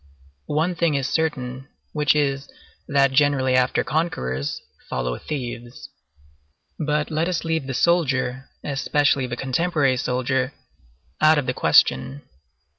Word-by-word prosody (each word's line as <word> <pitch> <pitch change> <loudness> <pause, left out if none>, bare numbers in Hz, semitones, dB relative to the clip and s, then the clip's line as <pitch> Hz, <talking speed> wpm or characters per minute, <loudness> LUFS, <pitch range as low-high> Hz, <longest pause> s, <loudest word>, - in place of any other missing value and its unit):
One 160 +5 0
thing 170 -3 +1
is 135 -2 0
certain, 135 -5 -2 0.3
which 150 -1 +2
is, 140 -1 0 0.4
that 140 -1 +3
generally 135 -2 +3
after 130 0 +2
conquerors 75 - -2 0.3
follow - - -2
thieves. 120 -4 -6 0.9
But 150 0 -1
let 160 +2 0
us 175 -3 -1
leave 160 -4 -1
the 130 - -3
soldier, 135 -5 +1
especially 140 -1 +1
the 120 0 -5
contemporary 135 0 +1
soldier, 130 +2 -1 0.7
out 155 0 +6
of 145 - 0
the 125 - -1
question. 125 - +3
135 Hz, 120 wpm, -23 LUFS, 130-150 Hz, 0.9 s, out